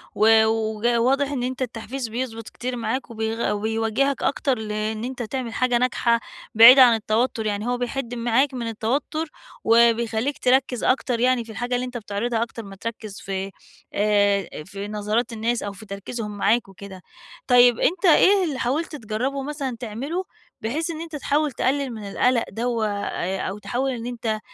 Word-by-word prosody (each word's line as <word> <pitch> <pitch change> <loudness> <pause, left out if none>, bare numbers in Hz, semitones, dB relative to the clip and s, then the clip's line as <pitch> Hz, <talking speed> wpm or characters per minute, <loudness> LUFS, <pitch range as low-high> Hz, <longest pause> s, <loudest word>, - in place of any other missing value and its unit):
و 220 +1 +5
وج 220 0 -1
واضح 265 +4 +2
إن 250 -3 -2
أنتَ 260 +1 -4
التحفيز 245 +1 -4
بيضبط 225 -1 -5
كتير 250 +1 -5
معاك 250 +2 -3
وبيغ 220 -1 -2
وبيوجهك 225 +6 0
أكتر 270 -3 +1
لإن 215 +1 -3
أنتَ 255 -1 -4
تعمل 235 -1 -4
حاجة 250 0 +2
ناجحة، 235 -1 +2 0.4
بعيدة 250 +4 +10
عن 240 -2 +6
التوتّر، 220 +1 0
يعني 210 +2 -2
هو 245 0 0
بيحد 245 0 -3
معاك 240 +4 +1
من 235 -2 -4
التوتّر، 270 +8 -2 0.4
وبيخلّيك 235 +3 +3
تركز 255 -1 +1
أكتر 255 -2 +1
يعني 250 -1 +2
في 225 - -10
الحاجة 245 +2 -2
اللي 250 +1 -1
أنتَ 250 -1 -6
بتعرضها 225 +2 -2
أكتر 230 -1 -7
ما 195 -1 -10
تركز 215 -1 -7
في، 195 0 -4 0.4
آآ، 205 -2 +2 0.2
في 200 +1 -7
نظرات 215 +3 -1
الناس 230 +2 -1
أو 205 - -3
في 215 +2 -12
تركيزهم 205 +1 -6
معاك 220 +2 +2
وكده. 195 -1 -11 0.5
طيّب 245 -2 +6
أنتَ 365 +3 +1
إيه 380 +4 +6
اللي 285 -6 -2
حاولت 300 +6 -1
تجربه 255 +4 -3
مثلًا 275 -4 -4
تعمله، 265 - -4 0.4
بحيث 305 +10 -2
إن 320 0 -6
أنتَ 325 -2 -7
تحاول 295 +1 0
تقلل 270 +3 0
من 215 - -8
القلق 250 +1 +2
دَوَّة 230 -1 -1
آآ 195 -2 -3
أو 195 - -4
تحاول 245 +7 -2
إن 235 -2 -5
أنتَ 230 -3 -2
235 Hz, 170 wpm, -23 LUFS, 220-255 Hz, 0.5 s, بعيدة